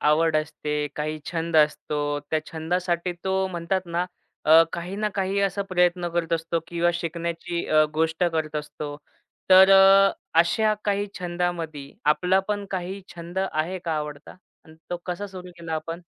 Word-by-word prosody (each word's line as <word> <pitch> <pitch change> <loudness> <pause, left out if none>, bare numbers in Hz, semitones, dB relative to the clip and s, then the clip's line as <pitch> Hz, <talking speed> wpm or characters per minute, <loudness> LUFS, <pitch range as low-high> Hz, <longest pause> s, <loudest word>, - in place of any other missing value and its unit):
आवड 155 +1 +3
असते, 150 -1 -2
काही 155 +1 -2
छंद 165 -1 -1
असतो. 150 -1 +1
त्या 155 -1 +1
छंदासाठी 175 +2 -1
तो 190 0 +1
म्हणतात 175 +1 -1
ना, 170 +1 -1 0.4
अ, 160 +2 +8
काही 180 +3 -5
ना 210 0 0
काही 195 0 0
असा 200 0 0
प्रयत्न 180 -1 +2
करत 170 -1 -1
असतो 165 0 0
किंवा 170 0 +1
शिकण्याची 170 0 -3
अ, 155 0 +5
गोष्ट 160 +2 +1
करत 160 -3 -1
असतो. 150 0 -5 0.5
तर 190 +1 +9
अ, 195 0 +7 0.3
अशा 215 +5 +2
काही 205 0 0
छंदामध्ये 175 -5 -3 0.2
आपला 180 +4 +3
पण 205 -1 -1
काही 190 +1 -4
छंद 170 +2 -6
आहे 165 +5 -1
का 165 - -1
आवडता 150 +1 -6 0.3
आणि 160 - -16 0.2
तो 175 - -1
कसा 185 +3 -3
सुरू 185 -2 -10
केला 165 -1 -5
आपण? 165 +2 -5
170 Hz, 155 wpm, -25 LUFS, 160-185 Hz, 0.5 s, तर